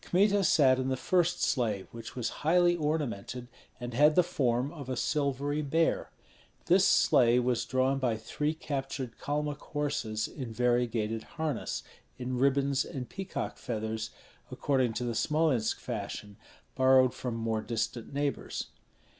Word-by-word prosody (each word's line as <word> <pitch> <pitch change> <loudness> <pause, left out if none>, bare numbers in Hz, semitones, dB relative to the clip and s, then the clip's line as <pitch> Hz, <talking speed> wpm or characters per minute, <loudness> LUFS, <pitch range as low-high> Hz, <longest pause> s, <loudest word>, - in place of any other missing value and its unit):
Kmita 200 +2 +3
sat 135 -6 +5
in 130 - -1
the 130 0 0
first 175 +3 +1
sleigh, 110 -7 0
which 115 -1 -9
was 120 -3 -1
highly 175 +3 +4
ornamented 135 -7 -2 0.3
and 120 0 -5
had 150 +5 +5
the 180 - +6
form 135 -5 0
of 140 -6 -8
a 130 - -2
silvery 145 +1 0
bear. 160 +3 +1 0.6
This - - +5
sleigh 120 0 +5
was 125 -1 0
drawn 130 +1 +1
by 120 -4 0
three 150 +7 -2
captured 135 -5 -4
Kalmuk 150 0 -2
horses 125 -7 -2
in 130 -6 -7
variegated 120 -2 +1 0.2
harness, 155 -5 -2 0.3
in 125 0 -3
ribbons 140 0 +2
and 130 -3 -6
peacock 195 -1 -5
feathers, 110 -1 -3 0.4
according 130 -5 +1
to 120 - -3
the 120 -1 -1
Smolensk 135 -2 +1
fashion, 105 -3 -5 0.4
borrowed 130 -1 +5
from 125 -3 -4
more 115 -1 -1
distant 115 0 -3
neighbors. 140 0 -3
130 Hz, 140 wpm, -30 LUFS, 120-150 Hz, 0.6 s, the